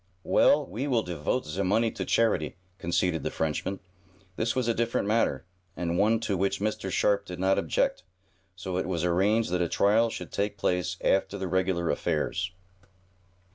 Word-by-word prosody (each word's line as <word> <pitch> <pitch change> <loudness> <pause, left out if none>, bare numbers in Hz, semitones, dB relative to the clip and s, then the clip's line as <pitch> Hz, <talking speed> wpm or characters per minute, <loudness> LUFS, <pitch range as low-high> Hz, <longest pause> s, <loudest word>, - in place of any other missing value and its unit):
"Well, - - +4
we 115 +11 -4
will 120 -5 +2
devote 90 +8 -2
ze 90 +6 -3
money 110 +4 +2
to - - -4
charity," 105 -10 +1 0.2
conceded 85 -1 0
the - - -2
Frenchman. 80 +5 -2 0.6
This 115 +5 -1
was 130 -2 0
a 115 - +3
different 115 -3 0
matter, 105 - +1 0.3
and 85 -1 -1
one 110 +4 +3
to 105 -3 -1
which 95 +1 0
Mr. 105 -1 -2
Sharp 100 +1 +2
did 90 -3 -8
not 95 +1 +3
object, - - 0 0.5
so 90 0 -4
it 90 - -1
was 85 -3 -1
arranged 95 +4 +2
that 90 0 +1
a 85 - 0
trial 110 +3 +3
should - - -7
take 100 0 -2
place 90 0 0
after 95 +1 +1
the 95 -1 -3
regular 90 -1 0
affairs. 90 +3 -1
95 Hz, 175 wpm, -28 LUFS, 90-110 Hz, 0.6 s, Well